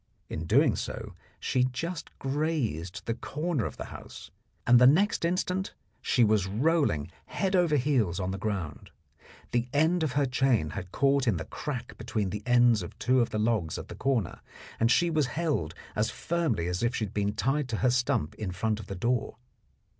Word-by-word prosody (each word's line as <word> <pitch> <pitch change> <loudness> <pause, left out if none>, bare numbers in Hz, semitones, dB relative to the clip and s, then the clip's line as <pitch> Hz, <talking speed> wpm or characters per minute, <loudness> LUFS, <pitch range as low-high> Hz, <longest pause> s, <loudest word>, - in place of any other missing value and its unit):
In 80 - -4
doing - - +4
so - - -5 0.3
she 125 - +1
just 160 +7 -4
grazed 135 - -2
the 115 - 0
corner 150 - -2
of - - -9
the - - -5
house, - - -10 0.3
and 120 0 +7
the 125 - +8
next 190 +10 +3
instant 180 +2 -1 0.3
she 125 - +3
was 105 -3 +3
rolling 115 - +1 0.2
head 195 0 -1
over 175 -4 +3
heels 125 - +1
on 95 0 -2
the 95 - -4
ground. 95 -8 -4 0.6
The 120 0 +1
end 160 +4 +3
of 155 -5 0
her 145 -1 +2
chain 125 - +1
had 95 -2 -6
caught 140 -1 +2
in 105 -6 +3
the 80 - -5
crack 125 -5 -6
between 110 -4 -2
the 105 - -4
ends 120 -3 +5
of 85 - -8
two 130 0 +3
of 115 - +1
the - - -3
logs 105 -7 0
at - - -8
the - - -7
corner, 125 -9 -1 0.4
and 115 - +3
she 175 +5 +3
was 155 -4 +2
held 135 - -1 0.2
as 105 +1 +1
firmly 160 - -1
as 90 +1 -2
if 120 +1 +1
she 110 - 0
had 100 - -10
been 105 0 0
tied 135 +6 0
to 110 - -1
her 125 - +5
stump 125 -11 0
in 105 -3 -5
front 110 +4 -1
of 105 - -9
the 100 - -5
door. 115 +2 -1
120 Hz, 195 wpm, -28 LUFS, 100-145 Hz, 0.6 s, the